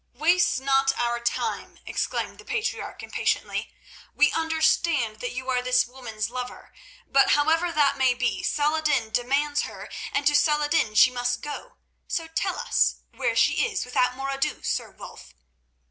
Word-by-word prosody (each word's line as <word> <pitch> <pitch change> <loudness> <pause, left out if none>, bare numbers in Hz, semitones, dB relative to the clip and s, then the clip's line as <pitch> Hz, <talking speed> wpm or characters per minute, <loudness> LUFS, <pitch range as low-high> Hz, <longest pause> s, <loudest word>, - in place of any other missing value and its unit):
"Waste 335 +1 +3
not 270 0 +3
our 240 0 0
time," 235 0 -3
exclaimed - - -3
the - - -11
patriarch 460 -1 -3
impatiently. - - -2 0.4
"We 295 0 +4
understand 315 -7 +1
that 245 - -4
you 255 +1 -6
are 250 -1 +1
this 250 0 +3
woman's 235 -3 -5
lover, 250 0 -7 0.3
but 275 0 +4
however 325 +4 +2
that 290 -3 +2
may 260 -2 +3
be, 250 0 -1
Saladin 300 -6 +1
demands 280 +5 +1
her, - - -8 0.2
and 285 - -1
to 295 - +4
Saladin 295 -5 +2
she 250 - +7
must 245 0 -1
go. 295 +12 -7 0.3
So 330 - -2
tell 325 +3 -2
us - - +2 0.2
where - - -1
she - - +3
is 445 - -3
without 250 0 +1
more 270 +1 -3
ado, 275 0 -2
Sir - - -2
Wulf." - - -13
275 Hz, 155 wpm, -25 LUFS, 250-310 Hz, 0.4 s, she